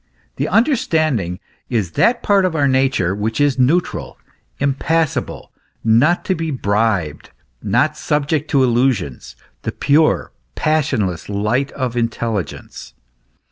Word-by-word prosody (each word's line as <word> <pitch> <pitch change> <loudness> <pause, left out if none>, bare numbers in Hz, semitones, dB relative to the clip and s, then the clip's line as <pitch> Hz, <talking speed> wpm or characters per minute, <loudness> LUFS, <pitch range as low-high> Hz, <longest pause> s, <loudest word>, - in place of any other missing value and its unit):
The - - -1
understanding 155 - +1 0.3
is 105 -9 -1
that 235 - +2
part 200 -1 +3
of 180 -3 0
our 145 -2 +2
nature 130 -9 +1
which 110 +4 -2
is 145 -2 +2
neutral, 155 +8 0 0.4
im 140 0 +1
passible, 160 +2 -2 0.3
not 120 +10 +3
to 190 - +1
be 165 -2 -3
bribed, 100 - -1 0.3
not 130 +9 +1
subject 150 0 -1
to 135 -3 +3
illusions 110 - 0 0.3
the - - -3
pure, 155 +2 +2 0.2
passionless 130 - 0
light 105 +7 0
of 130 -4 -3
the 120 - -1
intelligence. 110 - -4
130 Hz, 125 wpm, -18 LUFS, 105-155 Hz, 0.4 s, part